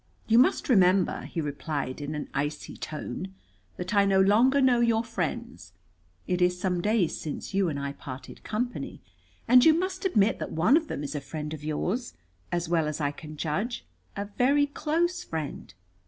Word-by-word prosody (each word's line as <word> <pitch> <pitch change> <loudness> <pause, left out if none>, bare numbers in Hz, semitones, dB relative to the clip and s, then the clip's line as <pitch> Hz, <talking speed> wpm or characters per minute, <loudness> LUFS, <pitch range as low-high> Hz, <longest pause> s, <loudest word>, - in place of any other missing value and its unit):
"You 225 +1 +5
must 255 - +3
remember," 190 -5 +3
he 165 - -3
replied 145 -2 -3
in 145 +1 -4
an 150 - -4
icy 145 +2 -3
tone, 185 +5 -6 0.4
"that 180 +4 -4
I 200 -1 +5
no 195 -1 +3
longer 230 +8 +5
know 255 -3 +4
your 230 -1 +3
friends. 230 - -4 0.5
It 180 0 -1
is 180 0 +2
some 180 -2 0
days 210 -4 +1
since 155 +4 -5
you 195 -2 +2
and 145 -2 -3
I 140 0 -3
parted 130 -2 -9
company. 245 +3 -3 0.5
And 250 +1 +7
you 320 -1 +7
must 370 +2 -2
admit 220 - +2
that - - -4
one 180 - +4
of 320 0 +2
them 145 - -4
is 145 - -4
a 145 - -3
friend 150 +2 -5
of 150 -2 -8
yours 180 - -2 0.4
as 175 -1 -1
well 165 -2 +1
as 150 0 -3
I 145 -2 0
can 155 +1 -10
judge, 205 +12 -2 0.3
a 200 - -3
very 260 +8 +2
close 325 +5 -1
friend." 155 -3 -5
190 Hz, 185 wpm, -27 LUFS, 155-240 Hz, 0.5 s, And